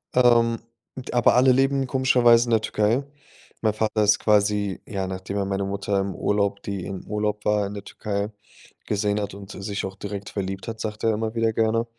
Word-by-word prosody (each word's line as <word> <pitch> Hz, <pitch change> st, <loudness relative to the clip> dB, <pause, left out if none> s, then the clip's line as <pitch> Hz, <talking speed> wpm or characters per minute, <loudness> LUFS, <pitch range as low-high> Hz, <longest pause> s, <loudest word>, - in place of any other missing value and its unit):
Ähm, 120 Hz, -2 st, +4 dB, 0.4 s
d 130 Hz, -, -7 dB
aber 120 Hz, -1 st, +4 dB
alle 130 Hz, +1 st, +6 dB
leben 135 Hz, +1 st, +2 dB
komischerweise 125 Hz, -3 st, +4 dB
in -, -, -2 dB
der 110 Hz, -1 st, +4 dB
Türkei. 110 Hz, +5 st, +1 dB, 0.6 s
Mein 110 Hz, -2 st, +2 dB
Vater 110 Hz, 0 st, 0 dB
ist 105 Hz, -, +4 dB
quasi, 105 Hz, -2 st, +1 dB
ja, 100 Hz, -3 st, -3 dB
nachdem 95 Hz, +1 st, -5 dB
er 100 Hz, -, 0 dB
meine 100 Hz, 0 st, -1 dB
Mutter 100 Hz, 0 st, -1 dB
im 95 Hz, -1 st, -2 dB
Urlaub 100 Hz, -1 st, 0 dB
die 100 Hz, -3 st, -4 dB
im 95 Hz, -1 st, -6 dB
Urlaub 105 Hz, 0 st, -2 dB
war 105 Hz, -1 st, +2 dB
in 100 Hz, -, -7 dB
der 100 Hz, -1 st, -7 dB
Türkei, 100 Hz, 0 st, -4 dB, 0.5 s
gesehen 105 Hz, 0 st, 0 dB
hat 100 Hz, -, -4 dB
und 100 Hz, 0 st, -10 dB
s 95 Hz, -, -8 dB
sich 100 Hz, -1 st, -3 dB
auch 95 Hz, 0 st, -6 dB
direkt 100 Hz, 0 st, -6 dB
verliebt 95 Hz, -1 st, -4 dB
hat, 115 Hz, -1 st, -5 dB
sagt 110 Hz, 0 st, -5 dB
er 115 Hz, -, +3 dB
immer 110 Hz, +1 st, -3 dB
wieder 115 Hz, -1 st, +1 dB
gerne 115 Hz, +1 st, +1 dB
105 Hz, 205 wpm, -24 LUFS, 100-115 Hz, 0.6 s, alle